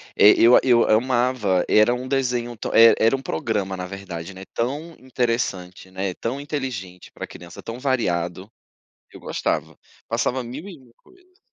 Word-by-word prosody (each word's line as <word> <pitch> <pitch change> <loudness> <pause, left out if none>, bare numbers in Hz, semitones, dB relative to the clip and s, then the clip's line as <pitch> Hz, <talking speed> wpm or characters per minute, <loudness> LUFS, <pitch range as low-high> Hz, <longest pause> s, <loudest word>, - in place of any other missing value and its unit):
É, 105 - +7
eu 120 +2 +6
eu 120 -3 +4
amava, 120 -4 +2
era 110 +3 +5
um 125 +1 -6
desenho, 125 -3 -1 0.2
e 115 0 +8
era 115 +4 +4
um 135 - -6
programa 95 -1 -2
na 90 - -4
verdade, 95 -2 -7
né, 95 +1 -10
tão 145 +8 -3
interessante, 115 -8 -3
né, 95 0 -3
tão 120 +4 -4
inteligente 130 - -6
para - - -6
criança, 85 0 -12
tão 115 +2 -7
variado. 95 -8 -1 0.6
Eu - - -12
gostava, - - -3 0.3
passava 130 +1 -1
mil 135 +11 -8
e 180 - -9
uma 125 -3 -21
coisas. 370 0 -25
115 Hz, 155 wpm, -22 LUFS, 95-130 Hz, 0.6 s, e